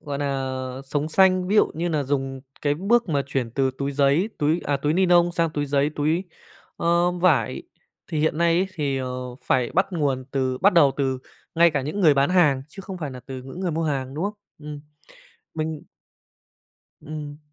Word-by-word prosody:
gọi 145 -1 -5
nà, 135 -2 -2 0.3
sống 145 +2 -2
xanh, 185 +2 +3
ví 205 - +2
dụ - - +6
như 170 +2 -1
nà 155 -3 0
dùng 135 -1 -2 0.2
cái 145 -1 +2
bước 215 +7 +2
mà 145 -3 +1
chuyển 130 -4 -2
từ 135 +2 +1
túi 140 0 -2
giấy, 140 +7 +2
túi 155 +4 +1
à, 145 - +1
túi 145 +2 0
nylon 175 -1 +4
sang 165 -1 +1
túi 145 -1 -2
giấy, 140 +1 +1
túi, 155 +5 +1 0.5
ơ, 170 +1 +2
vải, 175 -10 +1 0.5
thì 155 - -1
hiện 155 0 +1
nay 170 0 +3
ấy 190 - +1
thì, 140 -5 -1
ờ, 130 - -3 0.4
phải 125 -2 +1
bắt 190 - +3
nguồn 140 -6 0
từ 130 -2 -1
bắt 200 +7 +4
đầu 150 -6 +5
từ 135 -2 0 0.4
ngay 170 +1 +5
cả 145 -3 -1
những 155 +9 -3
người 155 -6 +6
bán 140 +3 +2
hàng 150 -8 +3
chứ 195 - -10
không 190 -1 -7
phải 150 -4 -4
nà 130 -1 -9
từ 130 -1 -7
những 135 +7 -9
người 185 -2 -1
mua 165 +1 -1
hàng, 135 -3 -2
đúng 160 +5 -2
không? 205 +1 -2 0.2
Ừm. 150 -1 -8 0.7
Mình 155 -1 -3 1.2
Ừm. 150 -1 -7
150 Hz, 200 wpm, -24 LUFS, 140-170 Hz, 1.2 s, dụ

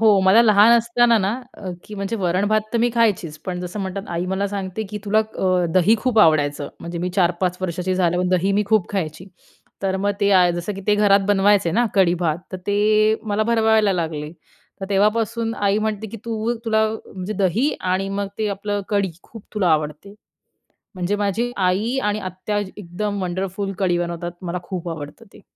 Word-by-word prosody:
हो 215 -3 +5
मला 190 +4 +6
लहान 215 0 +6
असताना 235 0 +3
ना, 195 -1 0 0.3
अ, 190 - -6
की 215 - -9
म्हणजे 200 +3 -3
वरण-भात 200 +3 +1
तर 235 - +1
मी 240 +1 +2
खायचीच, 195 -9 +1
पण 180 -1 -3
जसं 180 +3 -5
म्हणतात 195 0 -4
आई 175 +2 -2
मला 190 +2 -1
सांगते, 195 +1 -4
की 210 - -4
तुला 210 +1 +2
अ, 185 -4 0
दही 185 +4 +5
खूप 250 -1 0
आवडायचं. 145 -5 +3
म्हणजे 170 0 -6
मी 180 +1 -2
4-5 180 0 +1
वर्षाची 185 +1 -2
झाल्यावर 180 0 +1
दही 190 +3 0
मी 205 +1 +2
खूप 215 -3 +2
खायची. 170 -2 -3 0.6
तर 190 -1 0
मग 200 +1 0
ते 200 0 +3
आ 180 -2 +6
जसं 175 +4 -3
की 195 - -7
ते 210 - +4
घरात 205 -1 +4
बनवायचे 200 -3 +3
ना 240 +6 +2
कढी-भात, 175 -4 +2
तर - - -2
ते 215 +1 +3
मला 215 -1 0
भरवायला 220 -2 +3
लागले. 160 -4 -3 0.5
तर 195 - -4
तेव्हापासून 225 +3 +1
आई 200 -1 +1
म्हणते 215 0 -2
की 230 - -8
तू 230 0 -2
तुला 220 -1 +2 0.3
म्हणजे 190 +2 -4
दही 210 - +1
आणि 185 +1 -1
मग 200 0 -2
ते 215 - 0
आपलं 205 +1 -2
कढी, 200 -3 +1
खूप 225 -3 -12
तुला 200 -4 +1
आवडते. 155 +6 -2 0.8
म्हणजे 185 +3 -1
माझी 205 +4 -1
आई 195 +6 +1
आणि 210 0 0
आत्या 185 +2 -3 0.2
एकदम 200 +2 -4
वंडरफुल 190 +2 -3
कढी 180 -3 +1
बनवतात. 175 0 -3
मला 180 0 -3
खूप 175 -1 -5
आवडतं 145 -3 -8
ते. - - -15
195 Hz, 185 wpm, -21 LUFS, 180-215 Hz, 0.8 s, मला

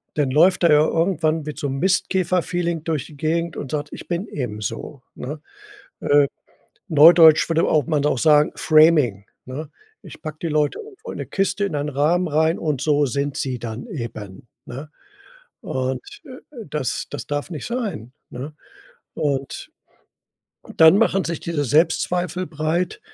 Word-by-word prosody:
Dann 145 -3 0
läuft 175 +6 +4
er 170 - +5
ja 150 +1 +5
irgendwann 165 -2 0
mit 150 -1 -7
so 145 - -2
'n 135 0 -3
Mistkäfer 185 0 +1
Feeling 170 -3 -2
durch 160 -5 -2
die 150 - -14
Gegend 165 +2 -1
und 135 - -6
sagt: 150 -1 -3
„Ich - - -9
bin 175 +4 -3
eben 120 -7 -5
so, 120 +6 -6
ne?“ 150 +4 -6 0.6
Äh, 145 -1 +4 0.6
Neudeutsch 160 +1 +7
würde 165 0 +2
auch 155 -3 +2
man 150 -3 0
auch 135 -4 +1
sagen, 150 0 +4
Framing, 155 -10 +4 0.2
ne? 140 +4 -7 0.3
Ich - - -12
packe 155 -1 -7
die 165 - 0
Leute 150 -1 0
irgendwo 445 +2 -10
in - - -7
'ne - - -5
Kiste 195 +1 -1
in 195 - -4
einen 145 +1 -2
Rahmen 155 +6 +1
rein 160 +2 +1
und 150 -5 -2
so 145 -1 +2
sind 140 +3 -2
sie 130 -2 -3
dann 115 - -6
eben, 115 - -8 0.2
ne? 140 +5 -8 0.7
Und, 130 0 -2 0.2
äh, 255 -3 -11
das 140 -4 -3
das - - -6
darf 145 +2 -3
nicht 155 -6 -6
sein, 205 - -4 0.2
ne? 135 +5 -7 0.6
Und 140 -3 -3 1.1
dann 160 +3 +7
machen 195 -4 +2
sich 170 -2 -4
diese 160 -4 -2
Selbstzweifel 175 +5 +1
breit. 170 - -2
155 Hz, 165 wpm, -21 LUFS, 140-170 Hz, 1.1 s, Neudeutsch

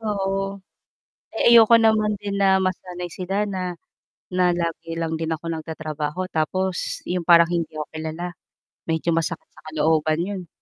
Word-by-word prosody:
Oo. 195 -2 -2 0.7
Eh, 235 - +4
ayoko 230 0 +8
naman 215 -2 +3
din 200 0 -4
na 195 -1 +4
masanay 180 -1 -3
sila 195 +3 -1
na, 185 -3 -4 0.6
na 180 0 +3
lagi 165 -1 -3
lang 165 -1 -2
din 160 -1 -2
ako 160 0 -3
nagtatrabaho, 155 +1 -4
tapos 185 +4 -1
yung 180 0 -1
parang, 170 0 +7
hindi 170 -1 -2
ako 150 - -3
kilala, 160 +3 -5 0.6
medyo 165 +1 0
masakit 165 0 -1
sa - - -17
kalooban 155 +1 +1
'yon. 190 -3 -5
175 Hz, 145 wpm, -23 LUFS, 160-195 Hz, 0.7 s, ayoko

